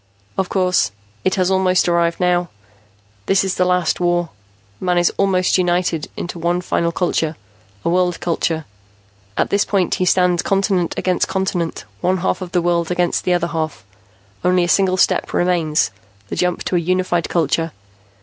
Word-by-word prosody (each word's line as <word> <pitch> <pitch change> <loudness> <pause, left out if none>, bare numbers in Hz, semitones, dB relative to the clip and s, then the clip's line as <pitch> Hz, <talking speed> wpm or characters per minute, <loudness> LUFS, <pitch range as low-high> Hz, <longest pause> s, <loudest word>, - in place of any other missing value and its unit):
"Of 190 -1 -1
course. 185 - +2 0.3
It 185 - +1
has 185 0 +1
almost 185 -1 +3
arrived 170 -1 +1
now. 180 -1 +1 0.8
This 195 0 +3
is 190 -1 -1
the 180 - +1
last 180 -2 +1
war. 175 -1 +1 0.5
Man 180 -1 0
is 175 0 +3
almost 190 -1 +2
united 175 -3 0
into 175 0 -5
one 175 +2 0
final 170 -1 0
culture 165 -3 -1 0.5
a - - +2
world 180 0 +1
culture. 165 -2 -1 0.7
At - - 0
this 200 0 +3
point 195 -3 0
he - - +3
stands 180 -1 +3
continent 195 -3 0
against 180 -1 +1
continent, 190 - -2 0.2
one 185 +1 +2
half 185 +2 -1
of 180 -1 -6
the 175 -2 +1
world 170 -1 +1
against 180 -1 0
the 180 - +2
other 175 -1 0
half. 155 - -3 0.6
Only 180 0 +3
a - - 0
single 185 0 +3
step - - +1
remains, 170 - +1 0.4
the - - -3
jump 180 -1 0
to - - -1
a - - +4
unified 175 0 0
culture. 165 0 0
180 Hz, 170 wpm, -19 LUFS, 170-185 Hz, 0.8 s, a